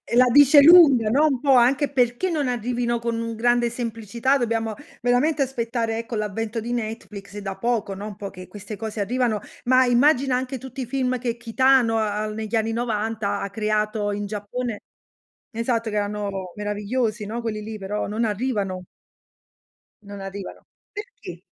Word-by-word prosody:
la 250 +1 +7
dice 285 +2 +8
lunga, 280 -8 +7
no, 280 +7 +4
un 275 -5 +1
po' 275 +1 +3
anche 260 +4 +4
perché 250 +6 +1
non 305 -5 -1
arrivino 240 0 -1
con 230 0 -2
un 230 0 -4
grande 240 +1 +2
semplicità, 235 +2 -1
dobbiamo 225 -3 -1 0.3
veramente 255 +5 +2
aspettare 235 -3 -1
ecco, 230 +1 -5
l'avvento 215 +2 -3
di 235 +2 -4
Netflix 215 -3 -6
da 195 -1 -5
poco, 220 -2 -1
no, 200 +2 -7
un 210 - -8
po' 200 -1 -6
che 185 -1 -11
queste 210 +1 -8
cose 220 +1 -6
arrivano, 230 +1 0 0.2
ma 255 +1 +4
immagina 255 +1 +3
anche 255 +1 -3
tutti 265 +2 -7
i - - -3
film 255 0 -1
che 240 -1 -3
Kitano, 245 0 +3
uhm, 215 0 -1
negli 220 +1 -3
anni 225 0 +1
'90 225 -2 -2
ha 200 - -3
creato 210 0 -1
in 205 0 -3
Giappone, 210 +2 -4 0.7
esatto 230 -1 -1
che 210 - -4
erano 205 -3 -3
meravigliosi, 210 +2 -2
no, 225 +3 -4
quelli 220 -2 -3
lì, 215 +1 -6
però 205 +1 -3
non 220 +3 -1
arrivano. 205 -4 -2 1.2
Non 200 0 -9
arrivano. 195 0 -8 0.3
Perché? 415 0 -9
230 Hz, 165 wpm, -23 LUFS, 210-250 Hz, 1.2 s, dice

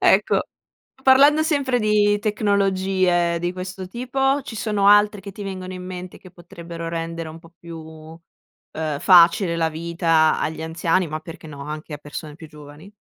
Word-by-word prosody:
Ecco, - - +3 0.6
parlando 280 +4 +6
sempre 280 -6 0
di 210 -1 +2
tecnologie 190 -4 +1
di 175 +1 -2
questo 185 +1 -7
tipo, 270 +5 -1
ci 225 - -8
sono 205 -1 +1
altre 205 0 +5
che 200 0 -9
ti 205 - -9
vengono 185 -1 -6
in 180 0 -8
mente 180 0 -8
che 185 - -15
potrebbero 170 -1 -9
rendere 165 0 -4
un 160 - -10
po' 165 0 -18
più, 170 -1 -10
uhm, 160 -1 -9
facile 170 -1 +5
la 165 -1 +1
vita 165 0 +1
agli 160 0 -3
anziani, 165 +2 0
ma 155 +1 -5
perché 165 0 -11
no, 140 -2 -9
anche 150 +1 -7
a 145 - -8
persone 150 +1 -8
più 160 - -11
giovani? 150 +5 -14
175 Hz, 165 wpm, -22 LUFS, 165-205 Hz, 0.6 s, parlando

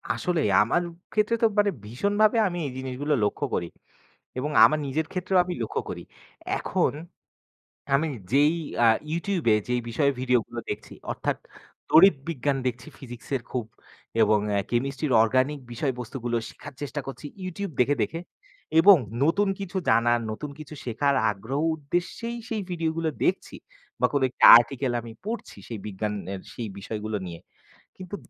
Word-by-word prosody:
আসলেই, 165 -10 0
আমার 120 +11 +2 0.3
ক্ষেত্রে 215 +2 +2
তো - - +5
মানে 205 -1 +3
ভীষণভাবে 205 - +2
আমি 175 -1 -4
এই - - -5
জিনিসগুলো 130 +3 -2
লক্ষ্য 105 - 0
করি। 85 - -2 0.7
এবং 145 +4 -2
আমার 155 - +6
নিজের 155 +4 -1
ক্ষেত্রেও 185 0 0
আমি 180 - -3
লক্ষ্য 110 - -2
করি। - - -6 0.5
এখন - - 0 1.0
আমি 155 +4 +2 0.2
যেই 145 +4 +5 0.3
আ - - +7 0.3
YouTube-এ 170 - +1
যেই 125 0 +1
বিষয়ে 140 +4 +2
ভিডিওগুলো 125 -2 0
দেখছি - - -6 0.2
অর্থাৎ - - -2 0.5
তড়িৎ 190 +3 +8
বিজ্ঞান 140 -3 0
দেখছি 125 +2 -3
Physics-এর 125 0 -5
খুব। 125 -3 -2 0.6
এবং 105 0 +4 0.3
Chemistry-র 135 +4 -1
Organic 130 +6 +1
বিষয়বস্তুগুলো 120 -1 -3
শেখার - - -11
চেষ্টা 145 +1 -3
করছি 135 +2 -7 0.2
YouTube 185 0 -5
দেখে, 135 +4 +4
দেখে। 165 - -2 0.6
এবং 195 +3 +9 0.3
নতুন 195 +6 +2
কিছু 195 0 -5
জানার, 120 0 +4
নতুন 140 +7 -5
কিছু 155 0 -9
শেখার 140 +4 +1 0.2
আগ্রহ 110 +8 -4 0.2
উদ্দেশ্যেই 175 +10 -3
সেই 220 -3 -2
ভিডিওগুলো 165 -1 -1 0.2
দেখছি। - - 0 0.5
বা 125 - +5
কোন 145 - +2
একটা - - 0
article 130 +1 -1
আমি 115 0 -10
পড়ছি 225 +1 -5
সেই 115 - -5
বিজ্ঞানের 100 -1 -4
সেই 115 -1 -5
বিষয়গুলো 105 +1 -4
নিয়ে। 85 -1 -8 0.6
কিন্তু 185 +1 -7
140 Hz, 140 wpm, -26 LUFS, 120-170 Hz, 1.0 s, এবং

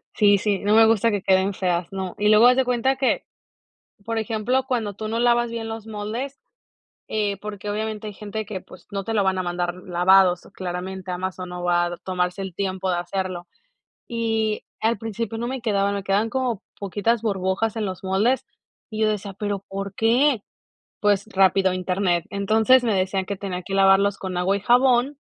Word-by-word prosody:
Sí, 205 -2 +5
sí, 200 0 0
no 205 +1 +2
me 225 0 +8
gusta 225 0 +3
que 205 -2 -1
queden 190 +1 +2
feas, 180 -2 -1
no. 190 -2 -4
Y 210 0 +2
luego 215 +3 +7
haz 250 +1 +5
de 265 - +3
cuenta 250 +2 +1
que, 265 0 +1 0.8
por 230 0 -2
ejemplo, 225 +4 0
cuando 225 -6 -1
tú 215 +2 -6
no 225 +1 -2
lavas 240 -1 +3
bien 230 -1 -4
los 225 -1 -6
moldes, 220 +6 -5 0.7
eh, 205 -2 -1
porque 205 0 -7
obviamente 215 0 -3
hay 210 - -6
gente 210 +1 -5
que, 195 -3 -6
pues, - - -16
no 200 -1 -3
te 225 - -3
la 210 - +3
van 190 -1 +1
a 185 - -1
mandar 175 0 -2
lavados 180 0 +3
claramente, 185 +1 -5
Amazon 185 0 -4
no 180 0 -6
va 175 0 +1
tomarse 180 0 -2
el 190 -2 -5
tiempo 190 0 -2
de 175 - 0
hacerlo. 180 0 -4 0.6
Y 225 -2 -1 0.2
al 225 0 +2
principio 225 +1 -4
no 235 +1 -3
me 260 0 -4
quedaba, 200 -3 +1
me 200 -1 -3
quedaban 200 +4 +1
como 245 -4 -1 0.2
poquitas 210 +3 0
burbujas 200 +1 -1
en 220 -2 -1
los 185 -2 -5
moldes 205 +7 +1 0.4
y 215 -1 -4
yo 215 - +4
decía: 205 -1 -3
"Pero 205 0 -3
¿por 195 0 -5
qué?" 240 +3 +3 0.6
Pues 205 -1 +2
rápido, 190 0 +4
Internet. 180 -1 0
Entonces 220 +5 +4
me 225 -3 +1
decían 190 0 0
que 200 - -3
tenía 185 -2 -5
que 195 - -5
lavarlos 195 +1 +4
con 185 -2 -5
agua 190 +3 +2
y - - -4
jabón 250 +4 +3
200 Hz, 190 wpm, -23 LUFS, 190-225 Hz, 0.8 s, me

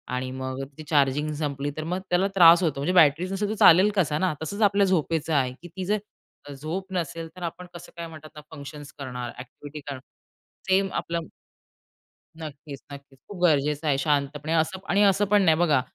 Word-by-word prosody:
आणि 130 0 -3
मग 130 +1 -5
ती 155 - -8
चार्जिंग 145 0 +2
संपली, 145 -1 -2
तर 155 - -3
मग 180 +3 -2
त्याला 180 +2 +2
त्रास 170 0 +8
होतो. 145 -4 0
म्हणजे 180 +6 0
बॅटरीच 170 +2 +4
नसेल, 205 +1 -2
तर 220 - -2
चालेल 185 +2 +7
कसा 150 -6 +1
ना, 185 -4 +1
तसंच 200 +7 -5
आपल्या 200 -1 +4
झोपेचं 165 -3 0
आहे, 130 -3 +1
की 175 - -10
ती 185 +2 -6
जर 210 +2 +1 0.6
झोप 180 +7 -5
नसेल, 165 -1 -3
तर 180 - -9
आपण 175 +2 -5
कसं 175 - -11
काय 170 0 -5
म्हणतात 155 -1 -11
ना, 150 - -9
फंक्शन्स 145 +1 -10
करणार? 125 -3 -5
अ‍ॅक्टिव्हिटी 140 +4 -10
करणार. 135 -2 -6 0.7
सेम 190 +1 +3
आपलं 170 -1 -3 1.1
नक्कीच, 145 -2 -9
नक्कीच. 140 -1 -12
खूप 195 -4 -9
गरजेचं 150 -1 +2
आहे. 140 -2 +2
शांतपणे 145 +2 -1
असं 165 +4 +1
पण 195 - -18
आणि 200 +2 +3
असं 200 +1 +4
पण 205 0 +3
नाही 160 -3 +4
बघा 155 -7 +3
160 Hz, 190 wpm, -25 LUFS, 140-180 Hz, 1.1 s, त्रास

